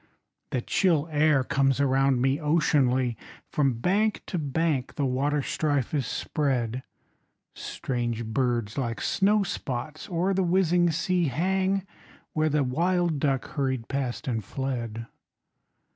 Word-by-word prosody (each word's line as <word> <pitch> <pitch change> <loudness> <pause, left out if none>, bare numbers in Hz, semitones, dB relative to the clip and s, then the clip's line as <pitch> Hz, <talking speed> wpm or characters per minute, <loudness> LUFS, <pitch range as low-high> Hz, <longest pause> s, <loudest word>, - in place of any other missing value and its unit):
The 125 - -1
chill 165 -6 +2
air 150 -2 +3
comes 135 0 +1
around 135 -2 +3
me 135 +2 +2
oceanly, 130 -6 +2 0.4
From 140 -3 +2
bank 205 - +1
to 180 - -3
bank 145 -2 -1
the 145 - 0
waterstrife 145 +1 0
is 140 -5 0
spread; 125 -3 -1 0.7
Strange 120 -3 -3
birds 120 0 -1
like 115 -3 -2
snowspots 155 - -1
oer 180 +2 +1
the 190 - +1
whizzing 175 -1 +3
sea 175 +2 +1
Hang 190 +6 0 0.5
where 155 0 +2
the 150 -1 +2
wild 170 +4 +1
duck 135 -2 0
hurried 130 -5 -2
past 135 -3 -3
and 115 -4 -1
fled. 115 -1 -4
140 Hz, 120 wpm, -27 LUFS, 130-165 Hz, 0.7 s, air